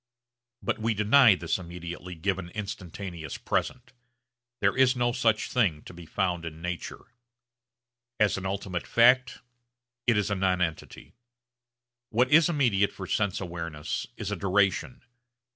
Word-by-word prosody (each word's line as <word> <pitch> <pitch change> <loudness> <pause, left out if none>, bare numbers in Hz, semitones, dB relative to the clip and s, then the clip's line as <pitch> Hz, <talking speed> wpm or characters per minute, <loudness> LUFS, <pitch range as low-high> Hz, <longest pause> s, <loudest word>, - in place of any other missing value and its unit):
But - - -1
we 110 0 0
deny 110 +2 +6
this 85 +1 -2
immediately 90 0 -8
given 95 +1 -2
instantaneous 95 -6 -6
present. 125 -1 -3 0.7
There 100 0 +2
is 130 0 +4
no 120 -1 +1
such 115 -2 +1
thing 90 -12 +1
to - - -11
be 85 -1 -11
found 90 -3 -1
in 80 -1 -7
nature. 90 +7 -6 1.1
As 105 -2 +3
an 95 -1 -4
ultimate 95 -2 -4
fact 125 +2 +4 0.7
it 115 -3 +4
is 105 0 0
a - - +1
nonentity. 90 -4 -2 1.0
What 125 +3 +2
is 160 +1 +6
immediate 120 - +2
for 95 - -8
sense 100 0 0
awareness 85 -4 -5
is - - -4
a - - 0
duration. 100 +4 0
100 Hz, 135 wpm, -27 LUFS, 90-115 Hz, 1.1 s, deny